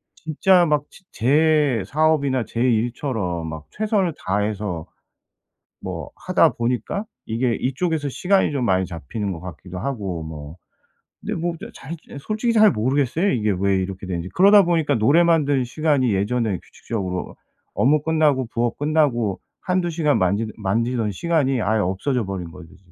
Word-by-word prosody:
진짜 175 +3 +3
막 150 -3 +1
지 - - -18
제 145 -2 +2
사업이나 140 -1 +1
제 115 - -4
일처럼 115 - -1
막 80 -1 -7
최선을 210 -5 0
다해서 100 -3 -2 1.0
뭐 - - -6
하다 - - +3
보니까 125 - -2 0.2
이게 115 +1 0
이쪽에서 145 +4 -1
시간이 190 +4 +2
좀 135 -3 -1
많이 95 -2 +2
잡히는 95 - -5
것 85 - -7
같기도 90 +1 -8
하고 100 -7 -3
뭐. 80 0 -8 0.7
근데 - - -4
뭐 170 +1 -2
저 - - -7
잘 135 - -11 0.2
잘 - - -11
이 - - -6
솔직히 220 - -1
잘 215 -2 +6
모르겠어요 140 - +1
이게 110 -4 +1
왜 100 0 +2
이렇게 95 0 -5
되는지. 90 -1 -4
그러다 200 +2 +7
보니까 160 -4 +1
노래 140 +10 +4
만드는 145 -6 +2
시간이 140 -3 +1
예전에 105 0 0
규칙적으로 95 -5 -5 0.4
업무 145 +4 +3
끝나고 150 -5 +2
부업 120 0 -1
끝나고 140 -9 +1 0.2
1-2 180 -1 0
시간 155 -3 +1
만지는 100 +4 0
만지던 115 +2 0
시간이 135 - 0
아예 110 +1 +1
없어져 105 +6 -1
버린 95 -3 -5
거죠 80 -1 -13
지금. 90 -1 -27
125 Hz, 335 characters per minute, -22 LUFS, 100-155 Hz, 1.0 s, 그러다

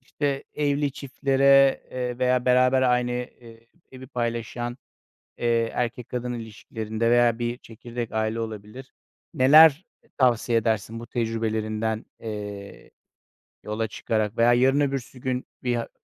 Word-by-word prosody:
işte, 140 +1 -3
evli 145 -1 0
çiftlere, 135 0 +3
eee, 125 -1 -4
veya 125 -1 +2
beraber 125 +1 +4
aynı, 125 -1 +2
eee, 115 -2 -8 0.3
evi 130 0 -10
paylaşan, 120 0 -3 0.6
eee, 115 -1 +1
erkek 120 0 -3
kadın 125 0 -3
ilişkilerinde 110 0 -4
veya 120 -1 +4
bir 120 0 -2
çekirdek 120 0 -7
aile 110 +1 -1
olabilir, 110 +3 -7 0.4
neler 155 +5 +7 0.3
tavsiye 120 -3 +2
edersin 110 0 -1
bu 120 - -9
tecrübelerinden, 110 -1 -2
eee, 105 -2 -8 0.7
yola 110 +1 -2
çıkarak? 110 0 -2
Veya 120 +1 +5
yarın 130 +4 +3
öbürsü 135 -2 -2
gün 125 0 -2 0.2
bir 125 -1 0
a 115 - -3
120 Hz, 125 wpm, -25 LUFS, 115-130 Hz, 0.7 s, neler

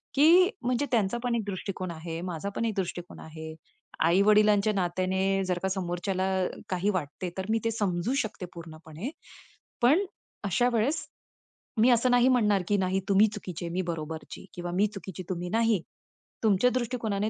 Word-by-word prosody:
की 340 +6 +7
म्हणजे 250 +2 0
त्यांचा 225 -2 +2
पण 245 -1 +1
एक 230 - -1
दृष्टिकोन 185 -2 -4
आहे, 165 0 -6
माझा 180 +1 -4
पण 230 - 0
एक 225 - 0
दृष्टिकोन 175 -1 -4
आहे. 160 0 -8 0.5
आई-वडिलांच्या 210 +3 +4
नात्याने 190 +1 0
जर 180 -1 0
का 190 - +1
समोरच्याला 185 0 -1 0.4
काही 185 +2 0
वाटते 180 0 -3
तर 190 - -2
मी 225 +1 +2
ते 230 - +2
समजू 205 0 -1
शकते 210 -3 -6
पूर्णपणे. 165 - -8 0.7
पण 295 +12 +5 0.4
अशा 240 +6 +2
वेळेस, 235 +7 0 0.7
मी 240 - +6
असं 245 +1 +3
नाही 245 0 +5
म्हणणार 210 -6 +3
की 205 - +3
नाही 190 0 +1
तुम्ही 200 +2 +6
चुकीचे 180 -4 -6
आहे, 170 - -5
मी 185 - 0
बरोबरची 160 0 -7
किंवा 175 0 -4
मी 205 +3 +3
चुकीची 190 -2 -7
तुम्ही 180 -1 -3
नाही. 225 -2 +2 0.6
तुमच्या 215 +2 +4
दृष्टिकोनाने 225 -4 -1
195 Hz, 160 wpm, -28 LUFS, 175-225 Hz, 0.7 s, की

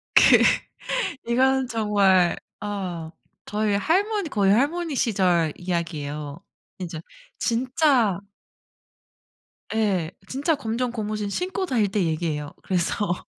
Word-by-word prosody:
그 - - +8 0.9
이건 265 +1 +3
정말 200 -6 +3 0.3
어 180 -6 -4 0.3
저의 210 -1 0
할머니 395 - +1
거의 200 -3 +3
할머니 305 +5 +1
시절 180 - +2
이야기예요. 150 -4 -4 0.4
진짜 165 -3 -5 0.4
진짜 245 - +2 1.6
예 190 -7 +1 0.2
진짜 290 +4 0
검정고무신 220 -4 -3
신고 370 - -2
다닐 225 -6 +2
때 200 -1 0
얘기예요. 155 -3 -2
그래서 180 0 -1
205 Hz, 210 characters per minute, -24 LUFS, 175-255 Hz, 1.6 s, 그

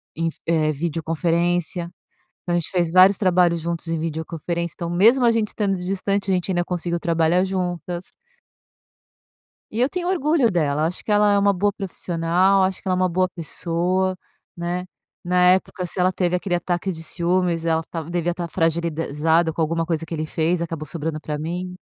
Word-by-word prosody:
em 165 +1 -1
f - - -13
eh, 155 -2 +2
videoconferência. 170 +2 -1 0.5
Então, 175 - -2
a 175 - +3
gente 165 - -2
fez 175 -3 0
vários 185 +1 +7
trabalhos 180 -3 +3
juntos 170 0 -4
em 165 -1 -1
videoconferência. 165 +1 -3
Então, 170 - -5
mesmo 230 +9 +4
a 235 - +5
gente 220 -2 0
estando 200 -3 -1
distante, 195 +2 -1
a - - +3
gente 180 +1 -1
ainda 175 -1 0
conseguiu 175 -1 -2
trabalhar 170 +1 +2
juntas. 180 -2 -3 1.7
E 225 - -3
eu 255 - +4
tenho 360 +2 -3
orgulho 305 -8 +2
dela. 150 -4 +1
Eu - - +3
acho 180 - -5
que - - -5
ela 205 0 +4
é 200 - +4
uma 200 0 +4
boa 200 +2 +1
profissional, 185 0 +1
acho 190 0 -1
que - - -5
ela 185 - +2
é - - 0
uma 185 - +3
boa 185 +2 +1
pessoa, 180 +2 -1 0.4
né? 175 +1 -3 0.4
Na 180 0 +2
época, 185 -1 -1
se 185 - -7
ela 185 +1 +3
teve 180 -1 0
aquele 180 0 -2
ataque 175 +1 -1
de 160 - -7
ciúmes, 175 0 0
ela 160 -1 +1
tava 165 -1 -5
devia 175 0 0
estar 175 -1 -4
fragilizada 165 -1 +1
com 165 - -1
alguma 165 +1 0
coisa 165 -2 -1
que 165 - -11
ele 155 0 -3
fez, 165 +2 0
acabou 165 -2 -4
sobrando 155 +1 -4
pra 150 0 -4
mim. 180 +4 -4
175 Hz, 190 wpm, -22 LUFS, 165-185 Hz, 1.7 s, vários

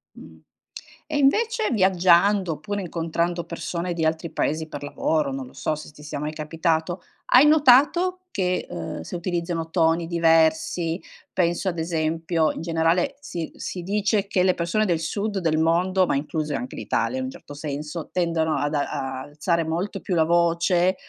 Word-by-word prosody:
Mh. - - -13 0.7
E - - +1
invece 440 - +2
viaggiando 185 -1 +4
oppure 200 +7 -4
incontrando 170 0 -2
persone 175 0 -4
di 165 -1 -1
altri 160 +1 -1
paesi 155 +1 -1
per 145 -1 -7
lavoro, 145 0 0
non 135 -1 -5
lo - - -15
so 140 +3 -1
se 155 - -9
ti 150 0 -15
sia 145 -1 -5
mai 150 +1 -3
capitato, 160 +2 -1 0.3
hai 255 +4 +8
notato 305 +5 +5
che, 185 -2 -1
uhm, 85 -1 -5
se 80 - -6
utilizzano 170 -1 -3
toni 165 -1 +2
diversi, 165 0 +2 0.3
penso 175 +1 0
ad 170 -2 -2
esempio 160 0 0
in - - -7
generale 165 +8 +1
si 175 - -6
si 180 - -5
dice 200 +2 0
che 185 -2 +2
le 185 -1 +3
persone 175 +6 0
del 170 -5 0
sud 200 +5 -2
del 160 -4 +1
mondo, 180 +3 +2
ma - - 0
incluse 150 +1 -2
anche 250 - -4
l'Italia 260 - -1
in 260 - -2
un 260 - -4
certo 205 - -12
senso, 150 +2 -5
tendono 165 -3 0
ad 145 +1 -1
a-a 135 -2 -2
alzare 165 +3 -1
molto 170 +5 -3
più 185 - -3
la 160 -2 +4
voce, 170 +2 +2
170 Hz, 170 wpm, -24 LUFS, 160-185 Hz, 0.7 s, hai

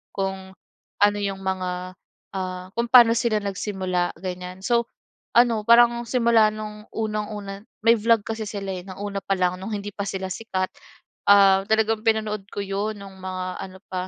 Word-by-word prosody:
kung 190 -1 -3 0.5
ano 205 0 +4
yung 195 -1 -3
mga 185 -1 -3 0.4
ah, 185 -1 -4
kung 235 +1 0
paano 240 -2 +9
sila 230 -3 +1
nagsimula 190 -3 -2
ganyan 180 0 -6
so 235 +3 +2 0.5
ano 235 -3 +4
parang 235 0 +6
simula 230 -3 +4
nung 210 0 -7
unang-una 210 -2 -4 0.2
May 230 0 +6
vlog 230 0 +3
kasi 220 0 -4
sila, 200 -2 -4
eh, 180 -1 -6
ng 190 - -8
una 200 -1 -3
pa 195 - 0
lang 180 0 0
nung 200 +4 -5
hindi 205 0 -5
pa 200 - -4
sila 190 0 -3
sikat, 190 -3 -2 0.6
ah, 195 -1 +7
talagang 220 0 +2
pinanood 215 -2 0
ko - - -5
yun 200 +2 -3
nung 195 -1 -12
mga 185 -1 -4
ano 190 0 -9
pa 185 0 -3
200 Hz, 165 wpm, -24 LUFS, 190-220 Hz, 0.6 s, paano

